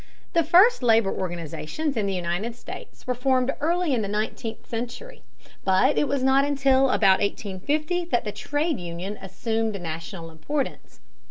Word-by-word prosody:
The 335 -2 +4
first 365 - +6
labor 225 -4 +4
organizations 175 - -3
in 210 -3 0
the 195 - -1
United 180 +6 -2
States - - -10
were 255 - 0
formed 255 +1 +1
early 340 0 +1
in 240 - +1
the 205 - -2
nineteenth 215 +2 -3
century, 245 - -6 0.4
but 190 +9 +3
it 295 - +2
was 275 -2 0
not 265 +1 +5
until 275 -2 +3
about 195 -6 +4
1850 285 - -1
that 285 -8 0
the 210 - -2
trade 295 +7 -1
union 175 +4 -5
assumed 220 +2 -2
national 165 +1 -6
importance. 270 - -4
235 Hz, 155 wpm, -25 LUFS, 195-285 Hz, 0.4 s, first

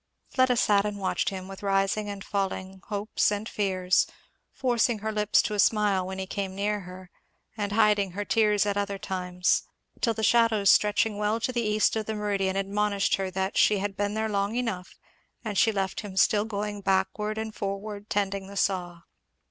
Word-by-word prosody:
Fleda 255 -2 +3
sat 205 -4 +3
and 210 0 -3
watched 190 -2 0
him, 190 -1 -7
with 195 0 -9
rising 195 +1 0
and 200 -1 -6
falling 190 -2 -3
hopes 210 0 0
and 205 +1 -3
fears, 185 -4 +1 0.4
forcing 240 -2 +1
her 215 +1 -3
lips 210 -1 +3
to - - -2
a 205 - -2
smile 200 -4 +3
when 190 0 -5
he 190 - -3
came 190 0 -4
near 205 +1 -1
her, 185 -1 -11 0.4
and 205 -2 -3
hiding 210 -3 +3
her 205 +2 -3
tears 210 -2 +3
at 205 -1 0
other 200 -1 -1
times; 180 -2 0 0.4
till 230 -2 +1
the 220 - -3
shadows 225 -3 +4
stretching 210 0 +2
well 210 +2 +1
to 240 - -1
the 240 -1 -1
east 215 -1 +2
of 220 -1 -2
the 220 - -2
meridian, 200 -2 -1
admonished 200 +1 0
her 190 -1 -3 0.2
she 210 - +4
had 195 0 -3
been 205 +1 -1
there 220 0 0
long 200 +1 -1
enough; 220 -7 -3 0.5
and 215 -2 -3
she 225 - +4
left 195 -2 -2
him 195 -3 -9
still 210 +2 +4
going 205 -1 -4
backward 195 +3 0
and 220 0 -4
forward 200 +1 -5
tending 195 -1 -1
the 200 0 -9
saw. 175 -4 -1
205 Hz, 190 wpm, -27 LUFS, 195-215 Hz, 0.5 s, shadows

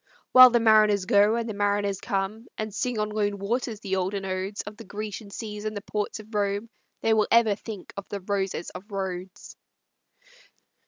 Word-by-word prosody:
"While 255 0 +10
the 240 0 +3
mariners 215 -3 +5
go, 205 +3 +4
and 235 0 -2
the 220 - -3
mariners 205 -1 0
come, 205 +4 -3
And 215 -1 -4
sing 245 +3 -2
on 210 0 0
lone 205 -1 -1
waters 220 +2 -2
the 190 -2 -1
olden 195 +1 -2
odes 190 +2 -3
Of 210 - -9
the 230 - -10
Grecian 210 -1 -6
seas 210 0 -6
and 215 -1 -3
the 200 - -6
ports 210 +1 -3
of 215 +1 -13
Rome, 205 +2 -1 0.3
They 225 - +3
will 215 -1 +3
ever 230 -2 +5
think 205 -1 -8
of 200 -1 -7
the 200 - -4
roses 195 -2 -2
of 180 +2 -9
Rhodes." 190 -2 -5
205 Hz, 190 wpm, -26 LUFS, 200-220 Hz, 0.3 s, While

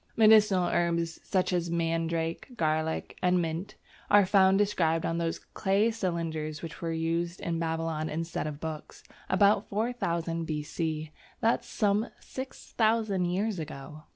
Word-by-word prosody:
Medicinal 210 -4 +6
herbs 170 -1 0
such 185 -1 0
as 175 -1 0
mandrake, 165 +6 -1
garlic, 155 -1 -1
and 180 0 +3
mint 165 +3 -3 0.3
are 205 -1 +6
found 190 0 +5
described 165 -6 +1
on 165 0 -1
those 165 -1 -1
clay 205 +3 +1
cylinders 165 -7 -3
which 165 +2 -7
were 165 -1 -2
used 165 +2 -1
in 165 -1 -2
Babylon 160 -1 -2
instead 165 0 -3
of 145 -1 -6
books, 155 -1 -7 0.3
about 200 +1 +3
4000 175 -7 -1
B.C., 155 0 -3 0.3
that 230 +1 +3
is - - -18
some 210 +1 +1
6000 220 -6 -1
years 190 +2 -1
ago! 155 0 -8
170 Hz, 135 wpm, -29 LUFS, 160-200 Hz, 0.3 s, Medicinal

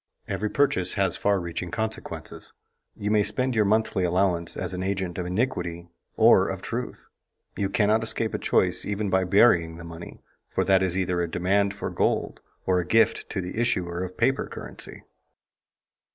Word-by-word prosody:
Every 105 - -2
purchase 95 -11 +2
has 95 -3 +1
far 100 -1 +1
reaching 85 0 -4
consequences. 110 0 -5 0.4
You 105 0 -2
may 105 -1 +4
spend 130 +5 0
your 110 -2 +3
monthly 105 -2 +1
allowance 90 -1 +1
as - - -3
an 90 - -3
agent 95 -2 -2
of 90 - -3
iniquity 90 -5 -2 0.3
or - - +6
of - - -5
truth. - - -5 0.5
You 100 -1 -1
cannot 105 +2 +2
escape 115 -1 -1
a - - -2
choice - - +1
even 105 -1 -2
by 95 0 +2
burying 90 -4 +4
the 85 - -9
money, 85 0 -10 0.3
for - - 0
that 95 -1 +4
is 95 -1 0
either 90 -2 0
a 85 - -2
demand 100 +3 +1
for 100 - -4
gold - - -1 0.2
or 90 -1 +2
a - - 0
gift 115 +6 +2
to 95 - -2
the 90 +6 -3
issuer 90 -6 -1
of 90 0 -7
paper 130 +4 +1
currency. - - -8
95 Hz, 175 wpm, -25 LUFS, 90-105 Hz, 0.5 s, or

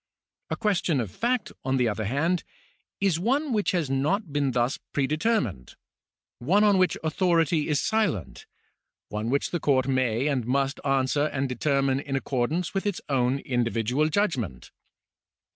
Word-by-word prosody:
A - - -1
question 180 - +1
of 110 -6 -3
fact, 240 -2 -1
on 130 0 0
the 125 -2 +2
other 110 0 -2
hand, 160 - 0 0.6
is 190 -5 +1
one 270 - 0
which 210 -2 +1
has 170 -5 0
not 145 +6 0
been 145 -2 +1
thus 125 +1 0
pre 140 - +1
determined— 150 - -1 0.6
one 180 - +3
on 205 -2 +4
which 185 - +2
authority 165 -2 +2
is 150 -2 +2
silent 160 - -1 0.3
— - - -61
one 105 +2 -3
which 140 +2 0
the 175 - -1
court 130 -4 +2
may 130 -2 +1
and 135 -6 0
must 135 +2 0
answer 135 +1 +1
and 140 -2 -1
determine 135 +1 +1
in 140 -1 -4
accordance 135 +6 -1
with 195 +1 -1
its 200 - -1
own 130 -1 +2
individual 120 +3 0
judgment. 140 - -1
140 Hz, 160 wpm, -26 LUFS, 125-175 Hz, 0.6 s, on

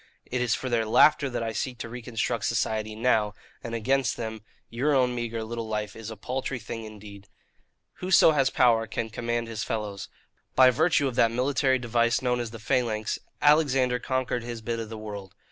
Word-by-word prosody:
It 125 0 -2
is 125 -1 +2
for 130 - -5
their 120 -2 +1
laughter 145 +5 +5
that 120 -2 -3
I 115 -1 -3
seek 125 +2 -3
to 115 - -6
reconstruct 120 0 -3
society 110 -1 -1
now; 110 -3 +1 0.3
and 115 0 -4
against 130 +2 +1
them 110 -2 -5 0.3
your 140 +5 0
own 125 -2 +3
meagre 115 -2 -3
little 115 0 -5
life 105 -1 -3
is 115 -1 -7
a 110 - -8
paltry 130 +4 -3
thing 115 0 -7
indeed. 105 -2 -11 0.7
"Whoso 180 -3 +5
has 135 -3 +2
power 115 -4 +3
can 110 +1 -4
command 120 +1 -2
his 110 -1 -4
fellows. 105 -3 -4 0.5
By 130 -1 +7
virtue 155 +1 +2
of 130 - -3
that 115 - +5
military 130 +2 +1
device 120 -1 +1
known 125 -1 0
as 120 -2 -3
the 115 - -9
phalanx, 110 -2 -1 0.2
Alexander 135 -5 +4
conquered 130 -1 -1
his 115 -1 -7
bit 115 0 -2
of 110 -1 -5
the 110 - -7
world. 100 -3 -8
115 Hz, 190 wpm, -27 LUFS, 110-130 Hz, 0.7 s, By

